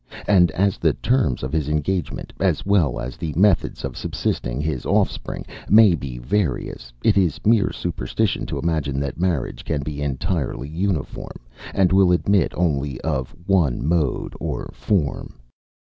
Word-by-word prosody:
And 90 -4 +5
as 100 +2 +1
the - - +3
terms 120 - 0
of 65 +3 -4
his 75 -2 0
engagement, 75 +4 -2
as - - +1
well 95 -10 +2
as 65 0 -5
the 80 -3 -4
methods 100 -1 +2
of - - -5
subsisting 60 +2 -2
his 75 -4 -2
offspring, - - -1 0.2
may 105 -3 +7
be 70 -6 -4
various, 60 -3 -2
it - - +4
is 85 -6 +1
mere 110 -1 +4
superstition 85 -8 -2
to - - -3
imagine 75 -5 -1
that 70 +2 -4
marriage 85 -8 -1
can 75 -3 -2
be 75 0 -5
entirely 70 0 -2
uniform, 85 -1 -3 0.4
and 95 -1 +2
will 95 -2 +5
admit 95 +1 +2
only 75 -6 0
of 65 -2 -2
one 85 -11 +2
mode 80 -6 0
or - - -4
form. 90 -9 -1
80 Hz, 150 wpm, -22 LUFS, 70-95 Hz, 0.4 s, may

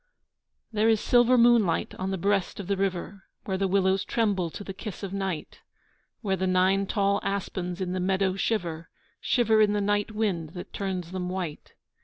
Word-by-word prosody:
There 220 0 +2
is 220 -1 +4
silver 245 +2 +4
moonlight 235 -8 +4
on 185 +1 -2
the 190 - -1
breast 200 +1 0
of 200 - -5
the 200 +2 0
river 195 0 -3 0.2
Where 190 - -1
the 195 - +2
willows 190 0 +2
tremble 200 -7 0
to 205 - -8
the 195 - -6
kiss 200 +1 -7
of 195 -1 -4
night, 190 -5 -4 0.6
Where 195 -3 0
the 190 0 -1
nine 190 +2 +2
tall 200 -1 +1
aspens 185 -2 -3
in 180 -1 -2
the 185 - -1
meadow 190 +1 +1
shiver, 170 -6 -2 0.3
Shiver 225 -3 +3
in 210 -1 +4
the 210 - +1
night 205 +1 +1
wind 195 -8 -2
that 180 - -8
turns 185 -3 -3
them 180 -1 -3
white. 180 -5 -5
195 Hz, 185 wpm, -27 LUFS, 185-205 Hz, 0.6 s, is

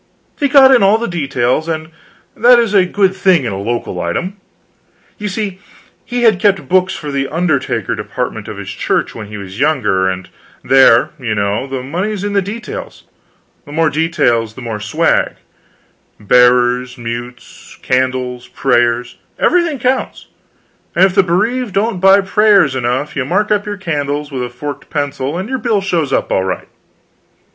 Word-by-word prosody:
He 285 - +2
got 270 -2 +7
in 250 - +5
all 200 +2 +5
the 235 +1 -3
details, 140 -3 -1
and 155 -1 -4 0.4
that 245 +2 +6
is 230 -3 +1
a 190 -3 +4
good 190 0 +1
thing 185 -7 +3
in 115 - -2
a 95 - -4
local 115 -4 -3
item: 180 - -3 0.8
you 210 - -3
see, 195 -1 -4 0.4
he 245 0 -3
had 220 -5 +4
kept 195 -1 +1
books 185 0 +2
for 150 -2 -6
the 135 -1 -1
undertaker 155 -4 -1
department - - -4
of - - -7
his - - -6
church - - -1
when 110 -2 -8
he 105 +1 -8
was 100 +1 -9
younger, 105 -11 +1
and 95 0 -5 0.4
there, 130 -3 +5
you 115 -5 -2
know, 100 +5 -1
the 135 -1 -5
money's 185 +8 -3
in 205 0 -2
the 200 - +2
details; 230 - -7 0.6
the - - -10
more 160 +1 +1
details, 120 -9 0
the 130 - -9
more 115 -3 -5
swag: 155 +11 0 0.8
bearers, 125 +3 +3
mutes, 120 +1 -8
candles, 125 -1 -1
prayers 120 -2 0 0.2
everything 340 -5 +2
counts; 255 +2 -2 0.7
and 180 +3 +6
if 190 - 0
the 195 - +5
bereaved 205 +6 -1
don't 200 -1 0
buy 195 +2 +6
prayers 200 -6 +3
enough 130 +3 -2
you 140 - -1
mark 200 +10 0
up 210 0 +1
your 205 -1 -4
candles 150 -5 -3
with 130 -2 -3
a 125 - -3
forked 145 +3 -7
pencil, 145 0 -3
and 190 +3 -4
your 265 +1 -3
bill 230 -5 +1
shows 170 -7 -1
up - - 0
all 95 - +1
right. 95 -1 -4
155 Hz, 170 wpm, -15 LUFS, 125-195 Hz, 0.8 s, got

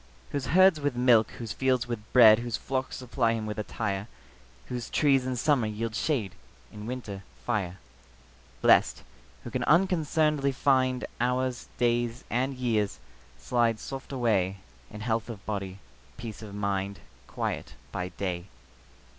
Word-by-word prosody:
Whose 140 -3 -2
herds 185 0 +5
with 145 -3 0
milk, 120 -3 +5
whose 115 -3 -5
fields 130 -2 +1
with 110 -3 -6
bread, 110 -3 +8
Whose 120 -1 -2
flocks 130 -1 -3
supply 120 -2 0
him 110 -1 -3
with 105 0 -4
attire; 105 -1 -3 0.6
Whose 125 -1 -5
trees 135 -4 +3
in 130 - -1
summer 125 -2 +2
yield 110 +1 -3
shade, 115 - -1 0.4
In 105 +1 -8
winter, 115 -6 -5 0.2
fire. 95 -6 -1 0.9
Blest, - - +5 0.4
who - - -7
can - - -1
unconcern'dly 155 -5 +2
find 130 -2 +2
Hours, 125 0 0
days, 120 0 +1
and 130 +3 0
years, 115 -5 0 0.4
slide 115 -3 +1
soft 135 +4 -7
away 105 -7 +1 0.3
In 105 0 -9
health 115 0 -1
of 105 -4 -8
body, 100 -3 -4 0.4
peace 115 -3 -7
of 105 -2 -8
mind, 100 -1 -2 0.3
Quiet - - -4 0.2
by 90 0 -3
day. 90 -1 -3
120 Hz, 140 wpm, -28 LUFS, 105-130 Hz, 0.9 s, bread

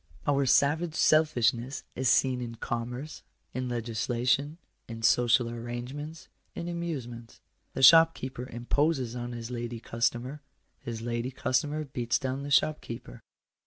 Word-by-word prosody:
Our 140 -1 +2
savage 155 +5 +3
selfishness 125 -5 +2
is 130 -1 +1
seen 130 -2 +3
in 115 -1 -5
commerce, 120 +6 -5 0.3
in 130 0 -3
legislation, 120 +5 0 0.3
in 115 -1 -8
social 120 +1 +4
arrange 120 +2 -5
ments, 150 +3 -8 0.3
in 170 - -5
amusements. 135 -10 -5 0.4
The 135 - -1
shopkeeper 130 -5 +5
imposes 125 +1 0
on 120 0 -5
his 115 0 -6
lady 120 -1 -4
customer; 120 +5 -2 0.4
his 115 -1 -6
lady 120 +1 -2
customer 135 +4 -1
beats 120 -3 -1
down 130 +1 -3
the 140 - -5
shopkeeper. 140 - 0
125 Hz, 125 wpm, -29 LUFS, 120-145 Hz, 0.4 s, shopkeeper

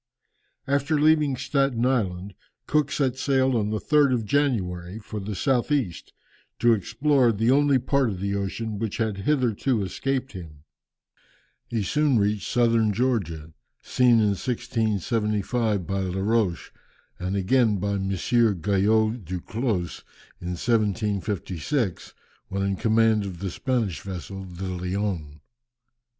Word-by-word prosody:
After 140 +2 +1
leaving 150 -3 +3
Staten 135 -4 0
Island, 100 -7 -1 0.3
Cook 150 0 +1
set 130 -3 0
sail 130 -1 +2
on 105 -2 0
the 110 - -1
3rd 145 +2 +3
of 115 -3 -2
January, 100 -9 -1
for 110 -1 -7
the 100 +1 -5
south 130 +7 0
east, 125 - -1 0.5
to 120 0 +4
explore 120 +5 +2
the 115 +3 +1
only 140 0 +4
part 130 0 +1
of 95 -4 -5
the 100 +1 -2
ocean 100 +2 -3
which 110 -2 -3
had 110 -3 -1
hitherto 125 -4 +1
escaped 135 +7 -2
him. 80 -6 -10 1.0
He 115 -3 -2
soon 150 +3 +2
reached 100 -1 0
Southern 115 -3 +3
Georgia, 95 -10 -1 0.3
seen 125 -1 +3
in 105 -1 +3
1675 110 -2 -1
by 95 +2 -2
Laroche, 95 0 -1 0.5
and 90 +2 -2
again 105 +2 +2
by 100 +2 -2
M. 95 -1 -2
Guyot 110 +2 +2
Duclos 95 +2 -3 0.4
in 90 0 -4
1756, 105 - -1 0.3
when 100 +1 -2
in 100 0 0
command 110 +1 +2
of 95 -3 -6
the 95 +1 -4
Spanish 115 - -1
vessel 95 0 -7
the 90 0 -8
Leön. 90 -4 -3
110 Hz, 130 wpm, -25 LUFS, 95-125 Hz, 1.0 s, to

